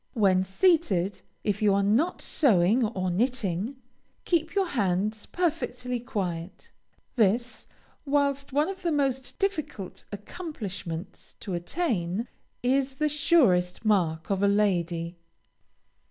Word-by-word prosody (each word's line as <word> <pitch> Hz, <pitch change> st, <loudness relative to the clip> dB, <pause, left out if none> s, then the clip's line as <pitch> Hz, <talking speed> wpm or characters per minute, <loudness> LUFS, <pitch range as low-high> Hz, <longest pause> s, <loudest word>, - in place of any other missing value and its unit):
When 190 Hz, -4 st, +4 dB
seated, 200 Hz, -, +2 dB, 0.2 s
if 205 Hz, 0 st, -1 dB
you 205 Hz, -2 st, +4 dB
are 200 Hz, -, +2 dB
not 245 Hz, -, +1 dB
sewing 220 Hz, -, +3 dB
or 185 Hz, -4 st, -2 dB
knitting, 215 Hz, +1 st, 0 dB, 0.5 s
keep 330 Hz, 0 st, 0 dB
your 395 Hz, -1 st, +3 dB
hands 210 Hz, -, -1 dB
perfectly 255 Hz, -8 st, -2 dB
quiet. 190 Hz, -8 st, -5 dB, 0.5 s
This, 235 Hz, +3 st, +1 dB, 0.4 s
whilst 280 Hz, -1 st, 0 dB
one 290 Hz, +3 st, +2 dB
of 380 Hz, -1 st, -6 dB
the 345 Hz, -3 st, 0 dB
most 265 Hz, -3 st, -1 dB
difficult 300 Hz, -, -3 dB
accomplishments 205 Hz, -, -7 dB
to 195 Hz, -, -5 dB
attain, 185 Hz, -, -1 dB, 0.4 s
is 265 Hz, +1 st, +1 dB
the 300 Hz, +2 st, +1 dB
surest 255 Hz, -, +3 dB
mark 175 Hz, -5 st, +1 dB
of 195 Hz, -1 st, +1 dB
a 200 Hz, -, +4 dB
lady. 175 Hz, -4 st, +1 dB
220 Hz, 115 wpm, -27 LUFS, 185-280 Hz, 0.5 s, When